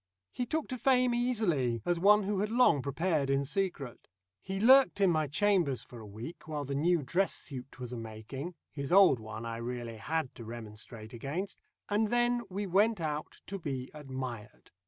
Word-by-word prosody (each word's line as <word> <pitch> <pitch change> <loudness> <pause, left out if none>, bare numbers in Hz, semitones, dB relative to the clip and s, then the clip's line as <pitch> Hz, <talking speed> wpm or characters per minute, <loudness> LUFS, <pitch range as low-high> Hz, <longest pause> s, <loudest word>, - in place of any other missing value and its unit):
He 245 - -3
took 315 +4 -1
to 255 -2 -4
fame 255 -1 +3
easily, 175 - +1
as 175 -1 +1
one 210 +3 +6
who 200 0 -1
had 210 +1 0
long 225 - +4
prepared 145 +1 0
in 135 0 +2
secret. 155 - -3 0.3
He 190 0 -4
lurked 260 +1 +6
in 195 -3 +5
my 155 -2 +1
chambers 160 - +2
for 120 - -12
a 110 - -10
week 115 +12 -9
while 150 -2 -3
the 140 - -4
new 165 +3 +2
dress 180 +9 +1
suit 135 -3 -8
was 125 -1 -6
a - - -4
making 115 +9 -7 0.2
his 140 0 -5
old 190 -9 +7
one 110 +1 -7
I 115 0 -4
really 120 -1 -5
had 155 +4 -2
to 115 - -10
remonstrate 110 0 -9
against 145 +11 -4 0.3
and 215 +2 +2
then 240 +1 +2
we 200 +2 -3
went 205 +3 +3
out 155 -2 -4
to 195 0 -5
be 135 -6 -4
admired. 130 -6 -7
155 Hz, 185 wpm, -31 LUFS, 125-200 Hz, 0.3 s, old